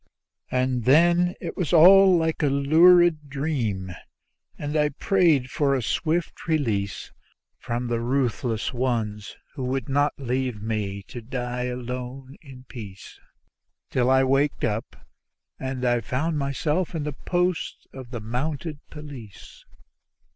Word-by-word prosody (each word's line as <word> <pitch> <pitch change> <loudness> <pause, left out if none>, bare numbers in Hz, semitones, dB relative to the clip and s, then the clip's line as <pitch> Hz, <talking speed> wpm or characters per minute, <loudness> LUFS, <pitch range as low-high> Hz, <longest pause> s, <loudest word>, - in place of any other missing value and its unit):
And 125 -2 0
then 175 +5 +4
it - - -6
was 180 -2 -2
all 185 +2 +8
like 160 -1 -1
a 150 - +3
lurid 155 +2 +5
dream, 125 - -2 0.7
and 145 +1 -4
I 150 -1 +3
prayed 155 - +2
for 140 -2 +1
a 130 - -2
swift 165 +9 -2
release 110 - -1 0.5
From 120 +1 -3
the 120 -1 -1
ruthless 120 -2 -1
ones 115 -5 -2 0.2
who 135 - -5
would 130 -1 -2
not 145 +1 +1
leave 130 -3 -2
me 105 -2 -3
to 120 - -9
die 125 +1 -4
alone 125 +2 -6
in 135 -4 -13
peace; 105 -7 -11 0.7
Till 125 0 +2
I 130 0 +5
wakened 135 +2 +1
up 110 0 -4 0.5
and 130 -1 -3
I 120 -1 +2
found 145 +8 -2
myself 150 +6 -1
at 155 - -2
the 150 0 -3
post 180 +4 -2
of 130 -2 -9
the 120 -2 -5
Mounted 145 +7 -4
Police. 140 - -11
130 Hz, 135 wpm, -24 LUFS, 120-155 Hz, 0.7 s, all